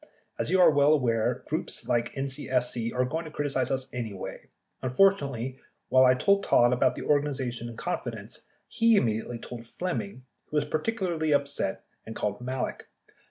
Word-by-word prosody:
As - - -1
you 185 +2 +3
are 180 - +7
well 145 +1 +5
aware, 115 -6 +1
groups - - -3
like 120 0 +1
NCSC 130 -4 -1
are 125 0 +1
going 160 +6 -3
to - - -7
criticize 140 -4 -1
us 135 -1 -1
anyway. 110 -6 -6 0.3
Unfortunately, 135 -4 +2 0.3
while 130 +1 +6
I 130 0 +6
told 200 +8 +3
Todd 120 +1 +4
about 125 - +2
the - - -6
organization 130 -5 0
in 115 - -10
confidence, - - -5 0.2
he 230 0 +3
immediately 115 - 0
told 115 0 -9
Flemming, 180 -3 -4 0.2
who 150 - -3
was 150 - +2
particularly 170 -3 -1
upset 140 -8 0 0.2
and 110 - -8
called 105 +2 -2
Malek. 130 +1 -4
130 Hz, 160 wpm, -28 LUFS, 120-150 Hz, 0.3 s, are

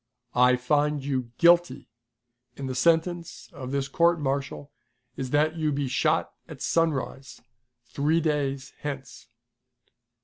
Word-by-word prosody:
"I 125 0 +5
find 145 +3 0
you 130 -4 -2
guilty, 175 0 +4 0.7
and 135 - -5
the 130 - -3
sentence 170 +5 0
of 130 -2 -7
this 140 0 -1
court 170 +4 +2
martial 140 0 -3 0.4
is 130 -1 -4
that 155 +4 +1
you 155 -2 0
be 140 -1 -1
shot 155 +5 +1
at 155 -4 -10
sunrise, 140 -5 -1 0.5
three 155 +4 +1
days 140 -4 -2
hence!" 135 -6 -7
145 Hz, 125 wpm, -26 LUFS, 135-160 Hz, 0.7 s, I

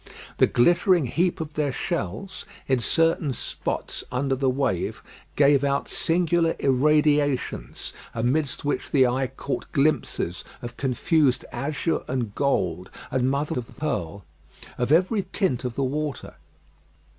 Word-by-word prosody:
The - - +5
glittering 175 +4 +4
heap 170 +8 0
of 155 -1 -5
their 150 -2 0
shells, 125 - -4 0.2
in 130 -2 +2
certain 165 +4 +1
spots - - -4
under 135 +2 0
the 135 0 +1
wave, 130 -9 -1 0.3
gave 140 -1 +4
out 140 0 0
singular 170 0 +1
irradiations, 145 - +1 0.2
amidst 130 +6 -1
which 145 - -1
the 135 -3 +5
eye 130 +2 +1
caught 135 +2 -5
glimpses 140 - 0 0.2
of 120 0 -6
confused 140 +1 +1
azure 150 +3 -1
and 120 -5 -2
gold, 90 - 0 0.2
and 130 0 +1
mother 140 -1 -1
of 120 - -10
pearl, 100 - -3 0.5
of 125 +2 -1
every 185 +4 +3
tint 140 - 0
of 125 -2 -3
the 140 - 0
water. 145 +1 -3
140 Hz, 130 wpm, -25 LUFS, 125-155 Hz, 0.5 s, The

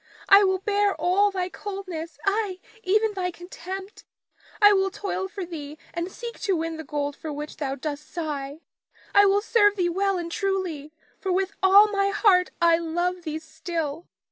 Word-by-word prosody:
I 400 +1 +9
will 380 -1 +2
bear 405 +1 +1
all 390 +3 +3
thy 370 -2 -2
coldness, 365 -7 -6
ay 395 -2 0 0.2
even 425 +2 +2
thy 370 -2 -2
contempt. 370 +3 -8 0.6
I 415 -1 +8
will 385 -1 +2
toil 385 0 -3
for 385 -1 -6
thee 305 -3 -8 0.2
and 340 +2 -3
seek 470 +2 -8
to 390 -3 0
win 325 0 -3
the 320 - -6
gold 290 0 -3
for 310 - -6
which 295 +1 -6
thou 275 -2 -2
dost 295 +1 -6
sigh, 300 -3 -4 0.5
I 405 0 +7
will 400 +1 +3
serve 410 -2 +4
thee 360 -3 +1
well 390 +2 0
and 340 -1 -4
truly, 360 -7 -2 0.3
for 380 - -2
with 380 +1 +1
all 400 +2 +7
my 395 -1 +1
heart 380 -3 +4
I 335 -1 +4
love 350 +2 -1
thee 315 -2 -4
still. 320 0 -5
365 Hz, 175 wpm, -25 LUFS, 320-395 Hz, 0.6 s, I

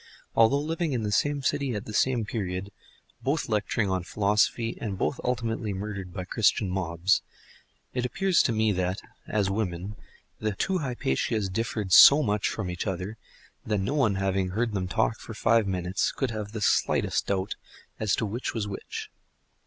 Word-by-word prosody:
Although 125 +5 +5
living 160 0 -1
in 120 -3 -1
the 105 - -1
same 145 +6 +1
city 140 -3 0
at 105 - -4
the 105 - -7
same 120 0 +2
period, 100 -2 -4 0.5
both 145 +3 0
lecturing 105 0 0
on 95 -1 0
philosophy, 105 +5 +1
and 100 -4 -3
both 125 - -1
ultimately 115 -4 -1
murdered 95 -2 -5
by 90 -1 -5
Christian 100 -1 +2
mobs; 90 0 +1 0.7
it 125 - -1
appears 190 +8 +2
to - - +1
me 110 -1 +2
that, 95 0 -1 0.3
as 100 -3 0
women, 95 -1 -3 0.4
the 110 -1 -1
two 190 - 0
Hypatias 110 - -1
differed 105 -1 -2
so 150 +2 +10
much 105 -2 +1
from 100 -5 -3
each 90 +4 -4
other 95 +3 -3 0.5
that 105 -1 0
no 100 +8 -1
one 120 -9 +2
having 95 -1 0
heard 115 +5 -1
them 95 -2 -1
talk - - 0
for - - -9
five 115 -2 +3
minutes 90 0 0
could 135 -4 -2
have 105 -2 -5
the 110 -1 -5
slightest - - +1
doubt 95 0 -1 0.4
as 105 -2 +2
to - - -1
which 115 +5 -3
was 105 -2 -1
which. 100 - -6
105 Hz, 175 wpm, -27 LUFS, 95-115 Hz, 0.7 s, so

